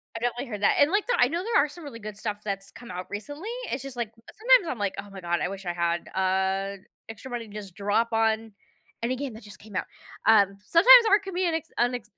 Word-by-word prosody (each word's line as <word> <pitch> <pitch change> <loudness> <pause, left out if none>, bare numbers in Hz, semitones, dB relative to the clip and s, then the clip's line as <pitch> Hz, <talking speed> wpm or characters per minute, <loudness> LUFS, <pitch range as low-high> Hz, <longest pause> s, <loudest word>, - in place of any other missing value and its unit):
I - - -3
definitely 245 +3 -2
heard 210 -4 -6
that 205 - +4
and, 295 +4 +5
like, 410 +3 +1
the - - +2
I 245 - +4
know 335 +4 -2
there 420 -9 +3
are 300 - -3
some 325 +1 -11
really 230 -5 -8
good 210 -1 -8
stuff 210 -1 -4
that's 195 -1 -4
come 235 -3 -11
out 180 +1 -6
recently. 290 - -6 0.2
It's 260 - -2
just, 270 -2 -8
like, 235 -3 -3 0.2
sometimes 475 -4 +4
I'm 250 - -3
like, 200 -2 -1
"Oh 205 - -8
my 195 -1 -10
god, 175 0 0
I - - 0
wish 195 0 -7
I 175 - -1
had, 170 0 -1
uh, 190 +1 0 0.3
extra 225 +3 -9
money 235 -2 -4
to 205 - -14
just 200 -4 -8
drop 205 +3 0
on 225 0 +1 0.5
any 250 +2 0
game 270 -2 -5
that 220 - -12
just 205 -2 -13
came 210 -2 -13
out," - - -1 0.4
um, 200 -3 +5
sometimes 470 - +8
art 405 0 +4
can 385 - -7
be 365 +1 0
an 335 - 0
acc 320 - -3
unacc 245 -1 0
225 Hz, 260 wpm, -26 LUFS, 200-285 Hz, 0.5 s, sometimes